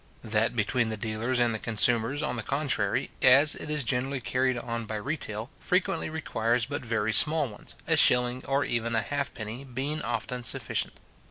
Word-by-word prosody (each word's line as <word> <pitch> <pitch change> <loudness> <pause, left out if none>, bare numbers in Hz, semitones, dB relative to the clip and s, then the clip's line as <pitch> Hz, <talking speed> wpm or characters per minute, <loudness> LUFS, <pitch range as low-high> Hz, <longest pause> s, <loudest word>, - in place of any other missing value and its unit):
That 110 +1 0
between 115 +1 0
the 110 - -4
dealers 110 +4 -2
and 120 -1 +2
the 110 - -3
consumers, 115 +5 +2
on 125 - -2
the 115 - -3
contrary, 135 -6 -1
as 140 +4 +7
it - - -5
is 150 -2 0
generally 130 +2 -1
carried 130 +1 0
on 115 -1 -4
by 110 - -4
retail, 110 -2 -3
frequently 180 -3 0
requires 120 -7 -1
but 145 +3 -4
very 110 -2 -1
small 155 +2 +5
ones, 105 -3 -8
a - - +3
shilling, 125 +1 +4
or 140 +1 +1
even 115 0 -1
a 110 - +1
halfpenny, 125 -2 -4
being 140 +4 -3
often 125 -1 -4
sufficient. - - -1
125 Hz, 175 wpm, -27 LUFS, 110-140 Hz, -, as